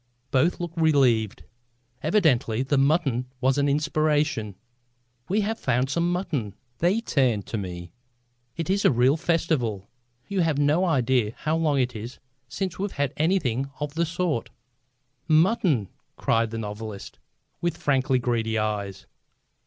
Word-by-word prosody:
Both 140 +7 +2
looked 170 -1 -5
relieved. 130 -9 +3 0.6
Evidently 140 - +2
the 135 +1 +1
mutton 135 -4 +1
was 135 +2 +2
an 140 0 +2
inspiration. 150 - 0 0.7
"We 205 +4 +2
have 220 +2 -2
found 125 +1 0
some 170 +3 +1
mutton." 155 - -2 0.2
They 185 +7 +2
turned 125 - +1
to 110 - -4
me. 90 -3 -7 0.7
"It 165 -2 -3
is 200 +2 +1
a - - +6
real 125 +2 +3
festival. 155 - -1 0.4
You 195 -2 0
have 160 -4 +1
no 150 +5 +3
idea 125 - +1
how 155 +1 -1
long 155 -4 +1
it 125 -2 0
is 115 +4 -7 0.3
since 185 +8 -4
we've 200 0 -2
had 145 -1 -1
anything 140 -6 0
of 145 -1 -3
the 170 +1 0
sort." 165 -8 -1 0.8
"Mutton!" 160 - +3 0.3
cried 115 0 +1
the 115 - -5
novelist, 105 -1 -7 0.4
with 170 -1 -1
frankly 135 -3 +1
greedy 115 -2 0
eyes. 100 -3 -3
140 Hz, 140 wpm, -25 LUFS, 115-165 Hz, 0.8 s, a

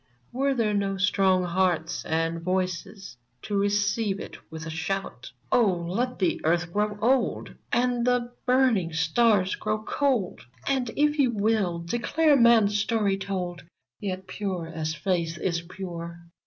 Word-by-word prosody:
Were 270 +2 0
there 220 -4 +1
no 200 -1 0
strong 190 -1 +3
hearts 175 -2 0
and 165 +1 -1
voices 185 - -3 0.3
To 205 - -3
receive 205 0 +1
it - - -8 0.2
with 160 0 -7
a 160 - -5
shout? 165 -6 -4 0.2
Oh 220 -6 +4
/ - - -5
let 250 +2 -1
the 185 -3 0
Earth 170 +1 +1
grow 210 0 0
old! 255 +2 +1 0.2
And 245 -1 +1
the 245 0 +1
burniiig 245 -11 +3
stars 190 +4 +3
grow 215 0 -2
cold! 250 -8 0 0.3
And, 260 -3 +1
if 295 +1 +2
you 265 -3 +4
will, 210 -5 +1
declare 285 - +2
man^s 235 -5 +5
story 205 -2 +1
told! 180 -3 -4 0.4
Yet, 190 -2 -4
pure 185 -2 -4
as 160 -1 -3
faith 170 0 -1
is 170 -2 -1
pure. 170 -1 -7
195 Hz, 145 wpm, -26 LUFS, 175-230 Hz, 0.4 s, man^s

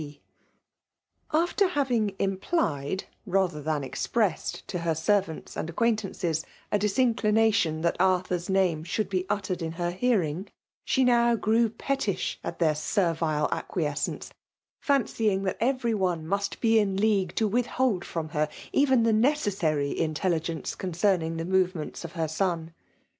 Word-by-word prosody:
P. 145 -1 -9 1.1
After 345 +5 +2
having 245 - 0
implied 190 - -1 0.2
rather 185 -5 +1
than 150 -1 -1
expressed 200 - -1
to 180 - -3
her 165 -1 0
servants 190 0 0
and 160 - -3
acquaintances 195 -5 0 0.3
a 210 - +2
disincli 215 +1 +2
nation 205 -8 +2
that 170 - +1
Arthur*s 180 -1 +1
name 185 -5 +2
should 195 +3 -2
be 185 -1 -1
uttered 195 -3 -2
in 165 0 -3
her 175 0 -2
hearing, 185 -4 0 0.4
she 265 - +2
now 235 -1 +4
grew 225 +1 +2
pettish 230 -2 -2
at - - -5
their 160 -3 +3
servile 160 -2 0
acquiescence; 150 -5 -3 0.5
fancying 225 -8 +1
that 190 - -1
every 240 -1 +1
one 180 -6 0
must 200 +3 -2
be 225 -1 +4
in 195 -2 0
league 200 -2 +1
to 220 - +2
withhold 240 -3 0
from 160 -2 -4
her 150 0 0 0.2
even 265 -4 +4
the 225 -1 +3
necessary 205 - +1
intelligence 165 0 -1
concerning 175 -2 0
the 165 - -3
movements 185 -4 0
of 170 - -7
her 165 -3 -1
son. 165 0 -2
190 Hz, 140 wpm, -27 LUFS, 165-220 Hz, 1.1 s, now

